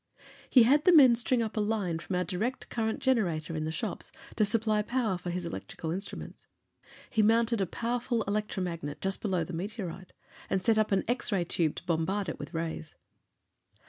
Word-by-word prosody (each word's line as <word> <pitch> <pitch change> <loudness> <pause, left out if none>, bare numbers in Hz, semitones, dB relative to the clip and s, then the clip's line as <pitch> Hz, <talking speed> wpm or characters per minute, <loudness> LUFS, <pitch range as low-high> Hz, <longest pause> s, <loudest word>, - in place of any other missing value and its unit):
He 250 - +7
had 285 +6 +4
the 365 - +7
men 270 -8 +8
string 240 0 +1
up 220 - -4
a - - 0
line 205 -6 0
from 180 - -4
our 180 - +1
direct 210 +9 -3
current 220 -1 -1
generator 175 - +1
in 155 0 -2
the 160 - -2
shops, - - -4 0.2
to 215 - +3
supply 215 0 +1
power 225 -2 0
for 175 0 -5
his 175 0 -3
electrical 165 -1 -5
instruments. 190 +4 -6 0.6
He 220 - +3
mounted 230 +1 +3
a 190 - +1
powerful 235 +2 -1
electromagnet 185 -7 -3
just 195 0 -2
below 185 -5 0
the 175 - -7
meteorite, 185 0 -5 0.4
and 190 - +1
set 220 +2 +3
up 215 - +1
an 195 - +2
X 240 0 0
ray 190 -4 +2
tube 165 -2 0
to - - -8
bombard 185 +4 0
it - - -6
with - - -7
rays. 165 -2 -4
205 Hz, 190 wpm, -30 LUFS, 175-230 Hz, 0.6 s, men